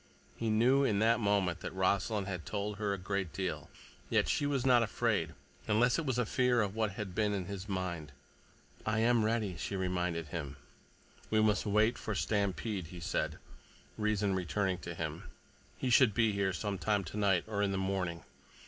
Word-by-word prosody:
He 115 Hz, -, -2 dB
knew, 125 Hz, +6 st, +4 dB
in 110 Hz, -7 st, +2 dB
that 115 Hz, +3 st, +3 dB
moment, 100 Hz, -5 st, +1 dB
that -, -, -6 dB
Rossland 100 Hz, +2 st, +1 dB
had 90 Hz, -4 st, -4 dB
told 105 Hz, 0 st, -3 dB
her 105 Hz, -2 st, 0 dB
a 100 Hz, -, -1 dB
great 95 Hz, -1 st, -2 dB
deal. 95 Hz, -2 st, -3 dB, 0.4 s
Yet -, -, +2 dB
she 145 Hz, -, +1 dB
was 135 Hz, -3 st, 0 dB
not 125 Hz, -2 st, +6 dB
afraid, 115 Hz, -, 0 dB, 0.3 s
unless 120 Hz, +6 st, +3 dB
it 160 Hz, -, -3 dB
was 130 Hz, -2 st, 0 dB
fear 125 Hz, 0 st, +2 dB
of 100 Hz, -2 st, -1 dB
what 110 Hz, -2 st, -1 dB
had 105 Hz, -4 st, -5 dB
been 105 Hz, +1 st, +1 dB
in 95 Hz, -3 st, -2 dB
his 100 Hz, +1 st, -6 dB
mind. 85 Hz, -6 st, -3 dB, 0.7 s
"I 110 Hz, 0 st, 0 dB
am 120 Hz, -1 st, +4 dB
ready," 110 Hz, -4 st, 0 dB
she 100 Hz, -, -4 dB
reminded 90 Hz, -4 st, -1 dB
him. 70 Hz, -4 st, -5 dB, 0.7 s
"We 110 Hz, -, +3 dB
must 105 Hz, 0 st, +2 dB
wait 110 Hz, +4 st, +3 dB
for 110 Hz, -, -3 dB
Stampede," 100 Hz, -2 st, -1 dB
he 90 Hz, +1 st, -9 dB
said, 85 Hz, -, -2 dB, 0.6 s
reason 105 Hz, -2 st, +1 dB
returning 95 Hz, 0 st, -1 dB
to -, -, -7 dB
him. -, -, -4 dB, 0.5 s
"He 130 Hz, -, -1 dB
should 120 Hz, -4 st, +5 dB
be 115 Hz, -2 st, +3 dB
here 100 Hz, -1 st, 0 dB
sometime 100 Hz, +1 st, -1 dB
tonight, 95 Hz, 0 st, +1 dB
or 105 Hz, -2 st, -2 dB
in 100 Hz, -1 st, +1 dB
the 95 Hz, -, -1 dB
morning. 95 Hz, -3 st, -2 dB
100 Hz, 180 wpm, -33 LUFS, 95-110 Hz, 0.7 s, not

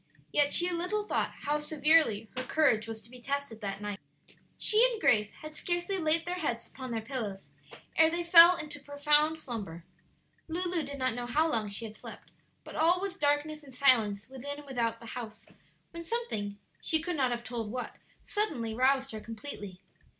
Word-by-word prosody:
Yet 290 Hz, -1 st, +3 dB
she 350 Hz, +1 st, +4 dB
little 360 Hz, +5 st, -1 dB
thought -, -, -1 dB
how 295 Hz, +1 st, 0 dB
severely 300 Hz, -7 st, +2 dB
her 255 Hz, -, -2 dB
courage 250 Hz, -5 st, +2 dB
was 220 Hz, -1 st, -7 dB
to 230 Hz, -, -15 dB
be 250 Hz, -1 st, -12 dB
tested 280 Hz, -4 st, -3 dB
that 200 Hz, -1 st, -4 dB
night. 205 Hz, -1 st, -4 dB, 0.6 s
She 435 Hz, +1 st, +4 dB
and 455 Hz, -, -5 dB
Grace 210 Hz, -, +3 dB
had 310 Hz, 0 st, -7 dB
scarcely 350 Hz, +4 st, -1 dB
laid 320 Hz, 0 st, +2 dB
their 360 Hz, +1 st, -3 dB
heads 240 Hz, -8 st, -2 dB
upon 260 Hz, -1 st, -9 dB
their 225 Hz, -2 st, -3 dB
pillows 220 Hz, -6 st, -5 dB, 0.5 s
ere 320 Hz, 0 st, +6 dB
they 340 Hz, +1 st, -2 dB
fell 340 Hz, +1 st, +9 dB
into 300 Hz, -3 st, -5 dB
profound 295 Hz, +2 st, +2 dB
slumber. 205 Hz, -, -6 dB, 0.6 s
Lulu 350 Hz, +1 st, 0 dB
did 280 Hz, -1 st, -6 dB
not 255 Hz, -2 st, +1 dB
know 245 Hz, +1 st, -4 dB
how 305 Hz, +6 st, +2 dB
long 220 Hz, -9 st, 0 dB
she 200 Hz, +3 st, -2 dB
had 215 Hz, -1 st, -9 dB
slept, -, -, -11 dB, 0.3 s
but -, -, -11 dB
all 340 Hz, +3 st, +3 dB
was 390 Hz, -1 st, -4 dB
darkness 300 Hz, -1 st, 0 dB
and 270 Hz, -4 st, -14 dB
silence 225 Hz, -7 st, +3 dB
within 270 Hz, +2 st, -6 dB
and 295 Hz, -, -11 dB
without 240 Hz, -4 st, -2 dB
the 230 Hz, -, -12 dB
house, 225 Hz, -2 st, -8 dB, 0.5 s
when 335 Hz, 0 st, -7 dB
something, 325 Hz, -, -3 dB, 0.2 s
she 320 Hz, -, +2 dB
could 345 Hz, +2 st, -3 dB
not 265 Hz, -4 st, +1 dB
have 240 Hz, -1 st, -3 dB
told 235 Hz, -3 st, -4 dB
what, 250 Hz, +3 st, -5 dB, 0.3 s
suddenly 280 Hz, -, -2 dB
roused 265 Hz, +3 st, +2 dB
her 220 Hz, -, -6 dB
completely. 215 Hz, -5 st, -8 dB
280 Hz, 185 wpm, -30 LUFS, 230-320 Hz, 0.6 s, fell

